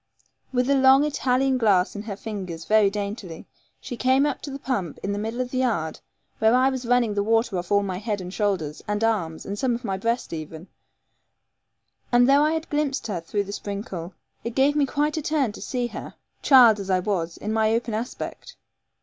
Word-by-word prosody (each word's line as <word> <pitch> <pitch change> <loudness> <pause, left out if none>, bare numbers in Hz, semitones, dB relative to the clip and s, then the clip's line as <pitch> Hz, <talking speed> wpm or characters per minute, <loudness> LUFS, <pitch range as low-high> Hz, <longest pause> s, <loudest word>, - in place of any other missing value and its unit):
With 250 -1 +1
a 280 - +3
long 265 +1 +6
Italian 265 -2 +1
glass 200 -5 +3
in 205 - -4
her 210 -2 -6
fingers 190 -6 -6
very 215 -2 +4
daintily, 200 -4 -5 0.3
she 245 - -6
came 260 +3 +3
up 290 -3 -2
to 290 - -6
the 275 - -5
pump 240 - -3
in 200 - -1
the 205 - -3
middle 225 +4 -3
of 250 0 -4
the 255 - -1
yard, 205 -12 -1 0.4
where 220 +2 +4
I 260 +1 +4
was 260 -2 -5
running 245 -3 +2
the 205 - 0
water 225 0 +1
off 175 +2 -8
all 200 0 +4
my 185 -2 -3
head 210 -1 -2
and 180 0 -7
shoulders, 185 -9 -1
and 210 +1 -1
arms, 180 -8 -1
and 200 +1 -5
some 250 -3 +1
of 240 +1 -7
my 195 -2 -1
breast 230 0 -2
even, 160 +2 -7 1.4
and 245 0 +5
though 280 +1 +5
I 305 +1 +3
had 320 0 -3
glimpsed 290 -4 -1
her 195 -6 -3
through 200 +5 -2
the 200 - -8
sprinkle, 200 -4 -6 0.3
it 235 0 -5
gave 275 +2 +3
me 290 -2 +2
quite 295 +3 0
a - - -1
turn 290 -6 0
to - - -11
see 250 -2 -2
her, - - -8 0.3
child 240 -6 +7
as 195 -1 -6
I 185 - +3
was, 180 -4 -2
in 215 +1 -4
my 220 0 +2
open 230 0 -1
aspect. 240 - -6
220 Hz, 215 wpm, -24 LUFS, 200-260 Hz, 1.4 s, child